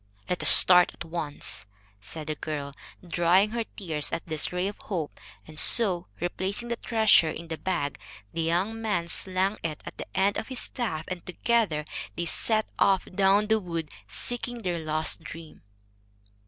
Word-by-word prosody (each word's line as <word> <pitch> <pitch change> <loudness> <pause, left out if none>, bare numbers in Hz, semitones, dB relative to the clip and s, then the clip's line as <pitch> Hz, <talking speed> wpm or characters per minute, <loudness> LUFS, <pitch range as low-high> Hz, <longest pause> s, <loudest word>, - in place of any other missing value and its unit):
"Let 180 - -2
us - - +7
start 180 -1 +8
at - - -8
once," 150 - -2 0.3
said 155 +9 -7
the 155 - -2
girl, 145 -2 -5 0.3
drying 175 +5 +3
her 235 0 -1
tears 160 -8 -3
at - - -3
this 155 -3 -1
ray 180 +1 -1
of 205 - -6
hope; 170 -8 -4 0.3
and 155 -1 -6
so, 185 -7 +4
replacing 190 +6 -3
the 235 - 0
treasure 220 -8 +4
in 165 +2 -7
the 160 - -3
bag, 175 -7 -2 0.3
the 165 - -2
young 185 +7 0
man 200 -6 -1
slung 190 +4 0
it 155 -2 -4
at - - -9
the - - -5
end 200 +1 +2
of - - -4
his 260 - -4
staff, 165 -11 -3
and 180 -2 -5
together 180 -5 +1 0.3
they 170 - -2
set 220 +5 +1
off 195 -2 +3
down 195 +2 +4
the 220 +1 +2
wood, 170 -5 -5 0.2
seeking 245 -1 -4
their 175 -2 -1
lost 155 +1 -1
dream. 160 0 -10
180 Hz, 170 wpm, -27 LUFS, 160-205 Hz, 0.3 s, start